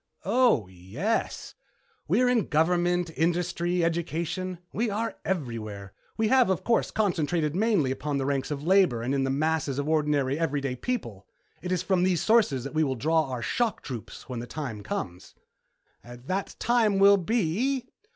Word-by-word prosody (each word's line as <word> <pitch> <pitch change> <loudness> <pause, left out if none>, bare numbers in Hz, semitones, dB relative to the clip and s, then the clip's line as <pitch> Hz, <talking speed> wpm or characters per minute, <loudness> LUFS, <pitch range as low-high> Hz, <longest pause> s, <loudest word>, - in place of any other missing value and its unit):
"Oh, 225 - +3
yes. 95 - -3 0.5
We 255 - +3
are - - +4
in 245 -4 +2
government, 175 +2 +1
industry, 175 +1 0
education. 170 +2 -2 0.2
We 230 +1 0
are 220 +2 -2
everywhere. 110 - -4 0.2
We 220 -1 +1
have, 255 -4 +4
of 190 - 0
course, 235 - +1
concentrated 170 -6 0
mainly 195 - +2
upon 145 +1 -2
the 135 - -1
ranks 135 -1 -1
of 145 -1 -4
labor 175 -10 +3
and 130 +3 -1
in 135 -1 +1
the - - -1
masses 150 -1 0
of 145 +1 -2
ordinary, 150 -3 +1
everyday 140 -5 -1
people. 120 - -4 0.3
It 180 - -4
is 185 - 0
from 190 -2 +1
these 180 -2 +2
sources 210 - +3
that 140 - -6
we 155 0 +2
will 135 -3 0
draw 160 +6 +2
our 125 -2 -4
shock 240 -3 -1
troops 120 -5 -8
when 125 -2 -5
the 120 - -6
time 125 -7 -5
comes." 90 -2 -6 0.7
"That 125 +11 -5
time 225 -4 +2
will 200 +1 +7
be 230 +7 0
165 Hz, 165 wpm, -27 LUFS, 135-195 Hz, 0.7 s, will